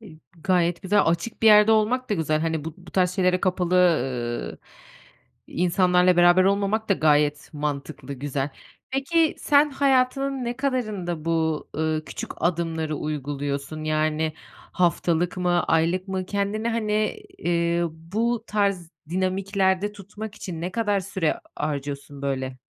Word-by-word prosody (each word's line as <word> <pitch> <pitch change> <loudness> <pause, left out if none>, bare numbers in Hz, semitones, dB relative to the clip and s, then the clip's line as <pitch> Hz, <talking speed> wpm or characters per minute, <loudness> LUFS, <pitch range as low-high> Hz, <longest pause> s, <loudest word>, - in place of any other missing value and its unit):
İ 170 -8 -13 0.2
gayet 175 -1 +1
güzel, 205 +1 +3
açık 170 +8 -1
bir - - +5
yerde 210 +1 +7
olmak 230 +3 +1
da - - +3
güzel, 155 -3 0
hani, 160 -2 -1
bu 160 -1 -6
bu 175 -1 -15
tarz 180 -2 +2
şeylere 185 -1 +2
kapalı, 180 -1 0
ııı, 130 -9 +1 0.9
insanlarla 180 0 +3
beraber 175 +1 +6
olmamak 200 +3 +1
da 195 - +4
gayet 150 -2 +2
mantıklı, 145 -1 -4
güzel. 140 +1 -3 0.4
Peki, 310 +4 +1
sen 295 0 +4
hayatının 270 -1 +1
ne 240 0 -3
kadarında 215 - -2
bu, 160 -2 0
ııı, 155 0 -1
küçük - - -7
adımları 160 -3 -1
uyguluyorsun? 145 +1 -4
Yani, 155 0 0 0.4
haftalık 175 0 +1
mı, 175 -1 +1
aylık 170 +4 +1
mı? 185 -1 -3
Kendini, 205 +3 -1
hani, 215 - -1 0.2
ııı, 170 -1 +1
bu 220 +8 -2
tarz 200 -5 0 0.2
dinamiklerde 190 +1 0
tutmak 210 +1 -9
için 170 -6 -7
ne 180 +2 -4
kadar 210 -4 +1
süre 185 -4 -1 0.2
harcıyorsun 140 -1 -4
böyle? 130 -2 -3
180 Hz, 135 wpm, -24 LUFS, 155-205 Hz, 0.9 s, yerde